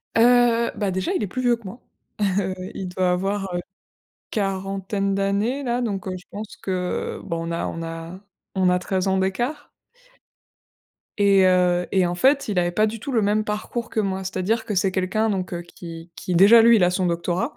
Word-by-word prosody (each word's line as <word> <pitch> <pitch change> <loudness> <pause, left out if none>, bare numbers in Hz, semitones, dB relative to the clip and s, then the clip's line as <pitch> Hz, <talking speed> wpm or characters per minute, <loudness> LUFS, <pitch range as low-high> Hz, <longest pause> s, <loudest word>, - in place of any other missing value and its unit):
Heu, 235 0 +4
bah, 205 -2 0
déjà 190 - -1
il 370 - 0
est - - -1
plus 255 +7 -4
vieux 245 -1 +3
que 230 - -18
moi. 200 +5 -9 0.4
Heu, 190 -2 0 0.2
il 190 - -5
doit 180 0 +1
avoir, 195 +1 -1
heu, 175 - -1 0.7
quarantaine 195 -1 -2
d'années 200 +8 0
là, 245 -1 -1
donc 200 -5 -3
heu, 185 - -3
je 180 - -15
pense 210 +1 -8
que 180 -2 -3
bon 165 -2 -4
on - - -3
a 170 - -2
on 165 - -5
a 165 +2 -7 0.4
on 185 -1 +3
a 180 0 +2
13 185 +1 -1
ans 190 0 +2
d'écart 240 +11 -2 1.5
et 200 -2 +5
heu, 180 -1 +3
et 190 -2 +3
en 175 - -2
fait 275 +8 +3
il 205 -4 -2
avait 175 0 +2
pas 215 +4 +2
du 225 +1 -5
tout 275 - -5
le 235 -4 +2
même 210 +1 +2
parcours 215 +3 -4
que - - -1
moi. 190 -2 -1
C'est-à-dire 190 +4 -1
que 210 - -3
c'est 190 0 +1
quelqu'un, 195 +4 0
donc 185 -3 -2
heu, 175 - -3
qui 170 -1 -10
qui 180 - -4
déjà 200 +7 +8
lui 235 0 +7
il 195 - +3
a 175 - +5
son 185 +1 0
doctorat, 175 - -1
195 Hz, 210 wpm, -23 LUFS, 180-220 Hz, 1.5 s, déjà